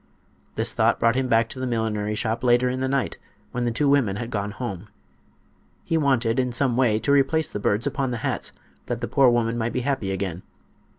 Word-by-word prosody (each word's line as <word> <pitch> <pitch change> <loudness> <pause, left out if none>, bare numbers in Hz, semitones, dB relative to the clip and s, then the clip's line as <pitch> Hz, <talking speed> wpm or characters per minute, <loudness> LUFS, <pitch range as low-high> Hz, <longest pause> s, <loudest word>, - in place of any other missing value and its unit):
This - - 0
thought - - +2
brought 115 0 +3
him 130 0 0
back 115 -1 +3
to 130 - -6
the 130 - -2
millinery 105 -3 -1
shop 115 +3 -2
later 120 0 +4
in 130 +1 -2
the 130 - 0
night, 135 -1 -1 0.3
when 125 0 -2
the 120 - 0
two 145 +6 0
women 135 -9 +3
had 115 +3 -5
gone 100 -2 -2
home. 105 -3 -6 1.0
He 165 - -1
wanted, 130 -6 +2
in 125 -1 0
some 125 0 +1
way, 120 -4 +3
to 140 - -1
replace 140 +3 +2
the - - -4
birds 105 +3 0
upon 140 -2 -1
the 120 - -2
hats, - - -2 0.4
that - - -2
the - - -2
poor 135 -2 +4
woman 120 -1 +1
might 115 +1 -2
be 125 - -1
happy 130 -6 -1
again. 95 -2 -3
120 Hz, 220 wpm, -24 LUFS, 110-130 Hz, 1.0 s, later